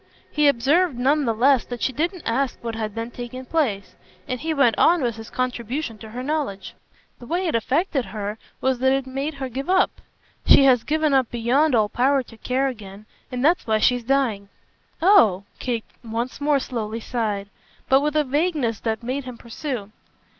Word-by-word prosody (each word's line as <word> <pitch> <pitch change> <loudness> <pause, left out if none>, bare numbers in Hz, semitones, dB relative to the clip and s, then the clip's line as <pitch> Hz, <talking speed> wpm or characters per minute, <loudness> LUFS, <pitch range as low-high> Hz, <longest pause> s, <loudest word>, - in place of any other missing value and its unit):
He 300 -1 +3
observed 285 +4 +3
none 280 +4 +2
the 230 - +1
less 260 +2 +4
that 245 -1 -6
she 260 - 0
didn't 340 +5 -2
ask 260 +3 0
what 230 -1 -3
had 215 -2 -4
then 230 +1 -4
taken 245 +2 -7
place; 245 - -1 0.3
and 255 - -3
he 320 +4 -2
went 275 -7 +3
on 340 -4 +4
with 235 -3 0
his 225 +1 -9
contribution 250 0 -3
to 220 - -10
her 245 +3 -6
knowledge. 270 -10 -3 0.5
"The 240 - -11
way 355 +5 -1
it 335 - 0
affected 270 - 0
her 210 0 -5 0.2
was 260 -2 +1
that 265 +1 +3
it 270 -1 0
made 275 +3 -4
her 270 -1 -4
give 270 +5 -5
up. 375 0 +2 0.4
She - - +7
has 255 -4 +5
given 310 -1 +1
up 265 -3 +3
beyond 250 +5 +2
all 215 -2 +3
power 265 +5 +2
to 230 -2 -16
care 260 +4 0
again, 210 -5 -8 0.3
and 250 +1 -1
that's 335 -2 +3
why 220 -1 +3
she's 245 +2 +2
dying." 230 -6 0 0.5
"Oh!" 280 - +5 0.2
Kate 235 -3 -2 0.2
once 235 +4 -4
more 290 0 +3
slowly 230 -4 -4
sighed, 215 -4 -3 0.4
but 270 +1 +5
with 300 +1 -1
a 305 - +4
vagueness 290 - 0
that 225 0 -2
made 260 +3 -3
him 250 -2 -8
pursue. 235 -3 -5
255 Hz, 190 wpm, -23 LUFS, 230-285 Hz, 0.5 s, She